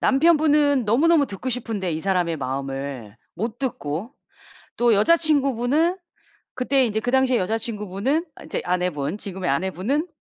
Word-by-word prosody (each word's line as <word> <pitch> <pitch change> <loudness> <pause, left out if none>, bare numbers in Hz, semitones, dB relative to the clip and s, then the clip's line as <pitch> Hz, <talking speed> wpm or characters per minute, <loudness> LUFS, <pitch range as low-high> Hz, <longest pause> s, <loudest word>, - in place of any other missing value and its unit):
남편분은 295 -2 +3
너무너무 285 +7 +3
듣고 205 +6 -6
싶은데 225 -7 -3
이 155 - -2
사람의 180 -3 0
마음을 135 -4 -5 0.2
못 220 +6 -4
듣고. 210 - -4 0.7
또 240 -1 +4
여자 335 +12 +4
친구분은 290 +2 +1 0.6
그때 260 +1 +2
이제 220 -1 -1
그 245 - -2
당시에 265 -1 +3
여자 220 +5 0
친구분은 220 - -2 0.2
이제 - - -3
아내분 180 -2 -1
지금의 190 -4 -4
아내분은 190 - -1
225 Hz, 330 characters per minute, -23 LUFS, 180-275 Hz, 0.7 s, 또